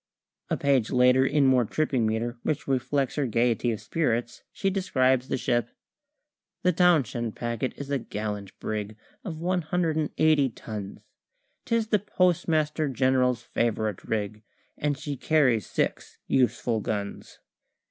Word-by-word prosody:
A - - 0
page 135 -5 +2
later, 125 +1 +5
in 145 -1 +3
more 130 -2 +5
tripping 130 -1 0
metre 115 +2 -1
(which 155 - -2
reflects 135 +1 0
her 145 -3 +1
gaiety 120 +1 +1
of 110 - -3
spirits), 120 -6 -1
she 195 - -1
describes 130 -9 +1
the - - -1
ship 120 -1 0 0.9
"The 180 - +3
Townshend 140 - +2
Packet 120 +1 -2
is 140 0 -7
a 140 - +1
gallant 105 -3 -5
brig 105 0 -4 0.3
Of 165 -7 -6
one 180 +2 0
hundred 165 0 0
and 155 -2 0
eighty 155 -4 +4
tons; 105 -4 -7 0.6
'Tis 230 -2 0
the 210 - +3
Postmaster 160 -5 +1
General's 125 -2 +2
favourite 110 -5 -1
rig, 105 -1 -3 0.3
And 145 -1 -1
she 145 -1 -4
carries 125 - +2
six - - -2
useful 125 -3 +1
guns. 100 -1 -4
130 Hz, 140 wpm, -27 LUFS, 115-155 Hz, 0.9 s, later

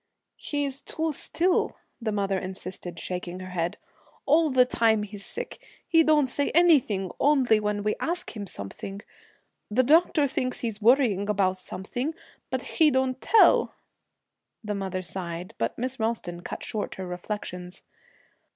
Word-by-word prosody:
'He's 285 -2 -3
too 320 -1 -2
still,' 355 +5 +1 0.2
the 220 -2 -1
mother 195 -2 0
insisted, 185 -2 -6
shaking 180 0 -5
her 185 0 -8
head. 170 -1 -2 0.5
'All 315 +2 +4
the 255 -2 +5
time 225 -3 +2
he's 205 -1 -7
sick, 485 - -6 0.2
he 330 -1 +5
don't 305 -2 +4
say 280 +3 -1
anything, 255 - +4
only 265 -7 +4
when 210 -1 -1
we 210 - +1
ask 350 -3 -3
him 205 -2 -5
something. 195 - -7 0.7
The 240 +5 +3
doctor 310 +2 +4
thinks 255 -1 -2
he's 225 -3 -3
worrying 220 -4 +4
about 190 -2 +2
something, 245 - -4 0.3
but - - -2
he 315 -3 +3
don't 260 -1 0
tell.' 455 - +5 0.9
The 210 -1 -2
mother 190 -2 -3
sighed, 175 +2 -4
but - - -1
Miss 255 +2 -1
Ralston 220 -6 -2
cut - - -6
short 210 -2 -3
her 190 - -5
reflections. 180 0 -6
215 Hz, 145 wpm, -26 LUFS, 190-275 Hz, 0.9 s, the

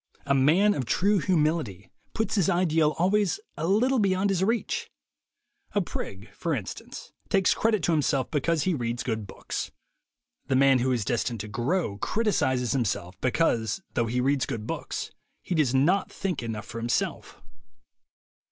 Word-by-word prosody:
A 140 - +2
man 160 +10 +4
of 130 - -2
true 200 - +2
humility 150 - 0 0.2
puts 220 -3 -1
his 195 -4 +2
ideal 165 -4 +2
always 200 - +2 0.2
a 160 - -2
little 245 +7 +3
beyond 195 -1 +2
his 190 -1 +1
reach. 225 +3 -1 0.9
A 205 - +3
prig, 100 - -6
for 165 -3 -1
instance, 105 -7 -7 0.2
takes 195 -1 +3
credit 215 -5 +1
to 170 - +2
him 155 - +3
self 135 -2 0
because 155 +1 +1
he 185 - +1
reads 120 -3 -2
good 110 -4 -3
books. - - -5 0.8
The 135 - +1
man 135 0 +5
who 130 +2 +1
is 120 -5 0
destined 120 0 -1
to 105 - -7
grow 120 - -1
criticizes 130 - +1
himself 100 -8 -1
because, 130 - +1
though 115 - +1
he 125 +3 -1
reads 135 +1 +1
good 115 -6 -4
books, - - -4 0.3
he - - -3
does 145 -6 +2
not 175 +9 +2
think 185 -7 -3
enough 110 -3 -5
for 115 - -7
himself. 120 +1 -2
145 Hz, 160 wpm, -27 LUFS, 120-185 Hz, 0.9 s, man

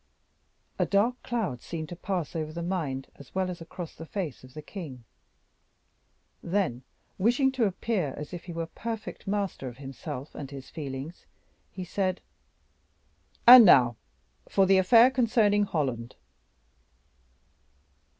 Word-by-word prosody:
A - - +3
dark 225 +5 +1
cloud 220 - -2
seemed 160 -2 -6
to 175 - -6
pass 180 -3 -3
over 155 -1 -3
the 170 +1 -5
mind 155 -7 -3
as 140 +3 -15
well 185 -1 0
as 175 - -9
across 165 0 -8
the 160 - -10
face 170 -11 -4
of 130 +2 -15
the 155 - -6
king; 150 - -8 1.4
then, 175 -9 -1 0.4
wishing 245 +7 +3
to 260 -4 +1
appear 190 - -1
as 150 +2 -7
if 175 - -7
he 175 - -7
were 165 0 -3
perfect 225 +6 -7
master 195 -8 -2
of 120 -1 -8
himself 135 0 -7
and 140 -3 -7
his 135 -2 -10
feelings, 140 +1 -7 0.4
he 185 - -6
said, 185 +1 -1 1.3
"And 245 0 +12
now 125 - +6 0.5
for 195 - +4
the 190 0 +5
affair 230 +7 +6
concerning 220 -5 +3
Holland." 130 - -2
175 Hz, 140 wpm, -28 LUFS, 140-205 Hz, 1.4 s, And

